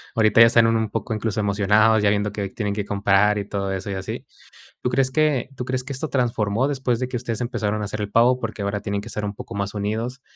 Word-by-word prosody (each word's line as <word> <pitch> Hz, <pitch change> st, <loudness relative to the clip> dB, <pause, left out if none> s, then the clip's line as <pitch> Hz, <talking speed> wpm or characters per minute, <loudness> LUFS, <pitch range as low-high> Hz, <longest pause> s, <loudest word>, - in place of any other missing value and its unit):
ahorita 110 Hz, -1 st, +4 dB
ya 115 Hz, -, +11 dB
están 115 Hz, -1 st, +5 dB
un 110 Hz, -1 st, +1 dB
poco 110 Hz, 0 st, -3 dB
incluso 110 Hz, 0 st, -2 dB
emocionados, 105 Hz, +2 st, +3 dB
ya 100 Hz, -, +4 dB
viendo 105 Hz, 0 st, 0 dB
que 100 Hz, -2 st, -4 dB
tienen 105 Hz, -1 st, -3 dB
que 105 Hz, -1 st, -2 dB
comprar 100 Hz, +1 st, +2 dB
y 100 Hz, -, -4 dB
todo 100 Hz, -1 st, -3 dB
eso 95 Hz, +1 st, -4 dB
y 100 Hz, -, -3 dB
así, 95 Hz, -, -5 dB, 0.6 s
¿tú -, -, +1 dB
crees 130 Hz, +1 st, +1 dB
que 150 Hz, -4 st, +1 dB
tú 125 Hz, -, -4 dB
crees 130 Hz, 0 st, -2 dB
que 140 Hz, +2 st, -7 dB
esto 140 Hz, +4 st, -4 dB
transformó 120 Hz, -1 st, 0 dB
después 130 Hz, -4 st, -1 dB
de 125 Hz, -, -2 dB
que 125 Hz, -, -4 dB
ustedes 115 Hz, -2 st, -3 dB
empezaron 110 Hz, -4 st, -2 dB
a -, -, -2 dB
hacer 110 Hz, +1 st, -5 dB
el 105 Hz, -1 st, -3 dB
pavo?, 120 Hz, +3 st, +4 dB
porque 110 Hz, -3 st, -5 dB
ahora 100 Hz, +1 st, -2 dB
tienen 100 Hz, 0 st, -2 dB
que 110 Hz, -, -9 dB
estar 105 Hz, -2 st, -4 dB
un 100 Hz, 0 st, -3 dB
poco 100 Hz, -, -8 dB
más 100 Hz, +1 st, -3 dB
unidos, 110 Hz, +6 st, -3 dB
110 Hz, 255 wpm, -23 LUFS, 100-120 Hz, 0.6 s, ya